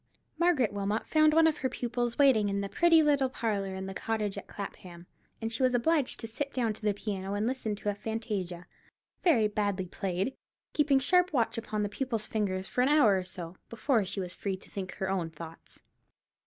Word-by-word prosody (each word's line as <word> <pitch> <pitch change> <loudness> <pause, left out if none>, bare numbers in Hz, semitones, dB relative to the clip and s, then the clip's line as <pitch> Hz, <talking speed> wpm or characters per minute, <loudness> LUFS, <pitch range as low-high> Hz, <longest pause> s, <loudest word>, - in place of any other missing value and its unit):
Margaret 320 - +3
Wilmot 205 +2 -1
found 310 -1 +4
one 325 +1 +5
of 320 -2 +3
her 260 - 0
pupils 240 -1 -2
waiting 255 -8 +5
in 200 0 -1
the 200 - -3
pretty 330 +2 +5
little 285 -3 +3
parlour 200 -6 -2
in 190 0 -5
the 195 - -5
cottage 215 -1 -2
at - - -7
Clapham, 180 -3 -8 0.3
and 225 0 -3
she 230 - -3
was 255 -1 +3
obliged 290 +2 +2
to 225 - -5
sit 275 +5 -4
down 235 -4 0
to 210 - -13
the 210 -2 +1
piano 200 -1 -3
and 205 +1 0
listen 235 -4 -1
to 210 0 -3
a - - +1
fantasia, 200 -5 -4 0.6
very 240 - +4
badly 205 -2 -1
played, 190 +6 -2 0.4
keeping 290 -2 +3
sharp 360 +6 +3
watch 230 -3 +1
upon 215 -2 -2
the - - 0
pupil's 225 0 -2
fingers, 190 -4 -1
for 250 - -1
an 255 - +3
hour 290 -10 +5
or 185 - 0
so, 180 -1 -8
before 230 -1 +1
she 195 +1 -4
was 180 -1 -4
free 195 -2 -3
to - - -16
think 185 -2 -5
her 190 - -3
own 185 -4 -1
thoughts. 165 +1 -11
215 Hz, 210 wpm, -30 LUFS, 195-260 Hz, 0.6 s, one